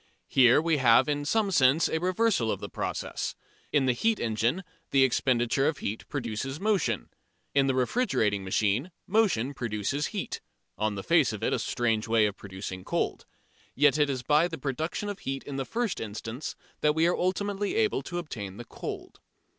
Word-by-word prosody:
Here 125 -1 +6
we 160 -1 +1
have 120 -2 +5
in 145 -1 -1
some 210 +5 +1
sense 145 -1 +4
a 160 - -1
reversal 185 - +1
of - - -2
the - - -7
process. - - -3 0.4
In 145 -3 +3
the 130 - +3
heat 225 - +1
engine 115 - 0 0.3
the 135 -1 +4
expenditure 130 +1 +2
of 155 - 0
heat 110 -5 -5
produces 135 0 -3
motion. 210 -1 0 0.4
In 140 -1 +3
the 135 - +1
refrigerating 125 - +1
machine 105 - 0 0.2
motion 180 - +2
produces 120 +3 -2
heat, 200 -3 -4 0.3
on 105 -1 -1
the 100 - -5
face - - +3
of - - -6
it - - +1
a - - +1
strange 115 -3 0
way 115 -1 +4
of 105 -1 -1
producing 95 -1 -7
cold. - - -2 0.5
Yet 150 0 +4
it 145 -1 +3
is 130 -2 -2
by 150 +5 +4
the 165 -2 -6
production 155 +9 -3
of 205 -2 -4
heat 135 0 -4
in 140 -1 -6
the 135 - -2
first 230 - -2
instance 110 +5 -5 0.2
that 150 0 +2
we 160 +1 +3
are 175 - +3
ultimately 200 - -1
able 435 -1 +2
to 175 - -6
obtain 105 - -6
the 120 - -8
cold. - - -7
135 Hz, 185 wpm, -28 LUFS, 115-175 Hz, 0.5 s, Here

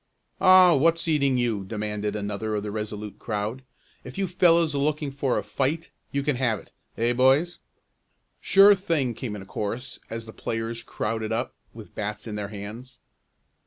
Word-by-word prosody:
"Aw, 185 -2 +7
what's 165 +4 +2
eating 140 -5 +2
you?" 115 -5 0
demanded 105 0 -3
another 105 +1 -3
of 105 - -2
the 105 - -4
Resolute 105 -1 -5
crowd. 110 +3 -3 0.4
"If 125 - -10
you 195 -1 0
fellows 170 -3 +4
are 140 - -1
looking 150 0 0
for 135 -2 0
a 105 - -1
fight 135 +10 -2 0.2
you 140 0 -1
can 145 -3 0
have 120 -4 +1
it; - - -15 0.3
eh 120 +1 +2
boys?" 135 +8 +3 0.8
"Sure 200 +1 +7
thing!" 165 -10 0
came 110 -1 -5
in 100 - -7
a - - -13
chorus, 115 +5 -5
as 115 0 -5
the 110 - -10
players 115 +1 -4
crowded 110 -1 -3
up, 120 +3 -2 0.2
with 110 -2 -12
bats 105 0 -4
in 110 - -5
their 105 -1 -3
hands. 110 +5 -8
120 Hz, 175 wpm, -25 LUFS, 105-145 Hz, 0.8 s, Aw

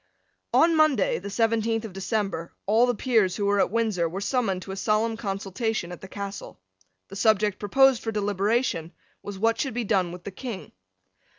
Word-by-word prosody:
On 330 0 +4
Monday, 310 -9 +3
the 200 - -7
seventeenth 225 +1 0
of 210 - -8
December, 195 -3 -3
all 225 +5 +4
the 245 - +1
Peers 220 -6 +2
who 205 - -1
were 200 0 +2
at - - +3
Windsor 210 -6 0
were 185 +4 -5
summoned 200 -4 -1
to 195 - -8
a - - -4
solemn 215 +3 +1
consultation 195 -1 -3
at 175 - -9
the 190 - -9
Castle. 200 - -7 0.5
The 195 - -9
subject 210 -1 +2
proposed 265 +4 +4
for 225 - -3
deliberation 205 -3 0 0.3
was 205 -1 -7
what 225 +3 +1
should 270 -5 -3
be 245 - -1
done 190 -5 +1
with 175 0 -9
the 200 - -6
King. 225 -1 -7
210 Hz, 185 wpm, -26 LUFS, 195-230 Hz, 0.5 s, On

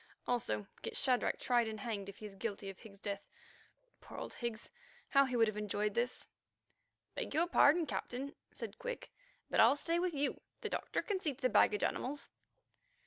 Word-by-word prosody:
Also 110 - 0 0.2
get - - -4
Shadrach 255 -2 +2
tried 240 -2 +3
and 215 -1 -5
hanged 200 -3 -3
if 200 - -10
he 215 - -8
is 205 - -7
guilty 200 -1 -4
of 190 - -17
Higgs's 200 -4 -13
death. 200 -1 -4 0.7
Poor - - -10
old - - -5
Higgs! 235 -2 -4 0.4
how 275 -1 +6
he 255 -2 -2
would 225 -1 +5
have 215 - -2
enjoyed 210 0 0
this." 240 +3 -1 0.9
"Beg - - -3
your 330 +2 +4
pardon, 335 -1 +5
Captain," 275 0 -3 0.2
said - - -6
Quick, - - -5 0.4
"but - - 0
I'll 235 +5 +8
stay 335 +4 +1
with 355 -2 0
you. 285 0 0 0.2
The 440 - -2
doctor - - -1
can 405 -3 -1
see 300 -7 -1
to 280 - -20
the 255 - +5
baggage 210 -4 +4
animals." 280 +3 -1
240 Hz, 190 wpm, -36 LUFS, 210-285 Hz, 0.9 s, I'll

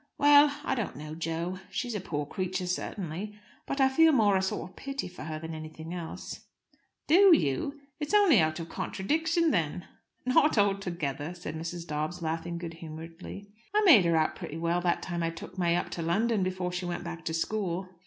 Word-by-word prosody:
"Well 290 0 +6
I - - 0
don't 235 -5 -2
know, 150 +2 -7
Jo. 165 +3 -3
She's 245 -2 -3
a 210 - -2
poor 150 -5 -3
creature, 185 +4 -3
certainly. 180 +2 -4 0.3
But 275 - -2
I 265 - +6
feel 320 +5 +5
more 215 -8 +4
a 190 - +3
sort 190 - -2
of - - -25
pity 275 -4 -4
for 180 -4 -9
her 155 -1 -4
than 160 +1 -6
anything 160 +1 -7
else." 170 -2 -7 0.6
"Do 360 +3 +7
you? 150 - -1 0.2
It's 295 -1 -3
only 385 - +6
out 155 0 +1
of 165 - -5
contradiction, 320 - 0
then." 170 0 -1 0.4
"Not 255 +2 +4
altogether," 175 -6 0
said 175 -3 -6
Mrs. 165 +1 -5
Dobbs, 155 +3 -3
laughing 165 +1 -3
good 170 -1 -6
humouredly. 165 +5 -9 0.2
"I 425 - +5
made 240 - +8
her 170 -1 +3
out 155 - +1
pretty 155 - -6
well 170 +1 0
that 175 -1 0
time 175 -2 -3
I 165 - +1
took 165 +3 -9
May 170 -1 +3
up - - -2
to 170 - -4
London 205 +6 +1
before 185 -1 -1
she 180 0 -3
went 175 0 -3
back 170 -1 -6
to 160 - -2
school." 185 0 -1
180 Hz, 195 wpm, -29 LUFS, 165-215 Hz, 0.6 s, made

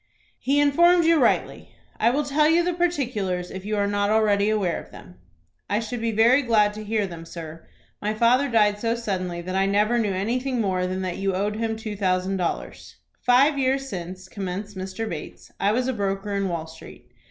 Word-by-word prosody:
"He 280 +2 +1
informed 340 +4 +4
you 330 -2 +4
rightly. 240 - 0 0.2
I 230 - +4
will 285 +5 +1
tell 295 +2 +2
you 335 +2 +4
the 355 +1 0
particulars, 240 - -1
if 190 0 -7
you 210 0 -2
are 200 - +2
not 205 0 0
already 210 -1 +3
aware 200 -5 0
of - - -16
them." 90 +1 -14 0.5
"I 205 - +1
should 225 +1 -5
be 230 0 0
very 230 +5 +4
glad 215 -5 +3
to 215 +1 -7
hear 215 -1 0
them, 170 -3 -8
sir. 165 -1 -9 0.3
My 210 +1 -1
father 250 +5 +3
died 210 -3 +3
so 230 +1 0
suddenly 185 -6 -3
that 185 +1 -5
I 195 +1 +2
never 210 +4 +2
knew 210 -3 0
anything 245 +7 -1
more 185 -4 0
than 185 +1 -3
that 185 -2 -3
you 195 -1 -1
owed 205 +2 -1
him 225 0 -1
two 220 -2 -6
thousand 190 -1 0
dollars." 175 -2 -4 0.3
"Five 275 +4 +5
years 270 +1 0
since," 185 0 -7
commenced 200 +1 -5
Mr. 190 +4 -5
Bates, 160 -7 -8
"I 200 - +2
was 250 +3 0
a 260 - 0
broker 200 -1 -2
in 200 -1 -1
Wall 165 -2 -3
Street. 160 -6 -13
210 Hz, 205 wpm, -24 LUFS, 190-245 Hz, 0.5 s, Five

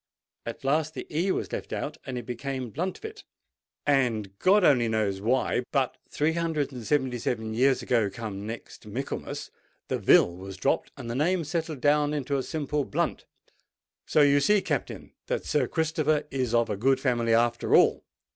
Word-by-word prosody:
At 115 +4 -6
last 155 +3 +1
the - - -5
e 180 +5 +2
was - - -2
left - - -5
out, - - -3
and 130 -2 -3
it 120 - -5
became 125 0 -4
Bluntvil; 410 - -4 0.6
and 115 -8 +1
God 200 +2 +5
only 125 -8 +5
knows 105 -3 0
why, 125 +3 +1
but 135 -3 +1
three 155 +2 +1
hundred 160 -4 -1
and 125 -3 -7
seventy 130 -4 +1
seven 110 -1 -2
years 130 +3 +3
ago, 115 -5 +2
come 105 -1 -6
next 115 +1 -8
Michaelmas, - - -5 0.4
the - - -1
vil 85 - +5
was 95 +1 -8
dropped, 135 +9 0
and 130 -4 -7
the 120 - -3
name 165 +7 +1
settled 160 -2 -3
down 150 0 +3
into 140 -1 -1
simple 150 0 -2
Blunt. - - -2 0.8
So 150 - +4
you 145 0 +5
see, 210 +9 +4
Captain, 145 -5 -3
that - - -2
Sir 145 -5 +1
Christopher 155 -1 +1
is 130 -3 -1
of 115 -1 +2
a 100 - -2
good 130 +5 +3
family 120 -4 +2
after 120 0 +2
all." - - +4
135 Hz, 175 wpm, -27 LUFS, 115-150 Hz, 0.8 s, God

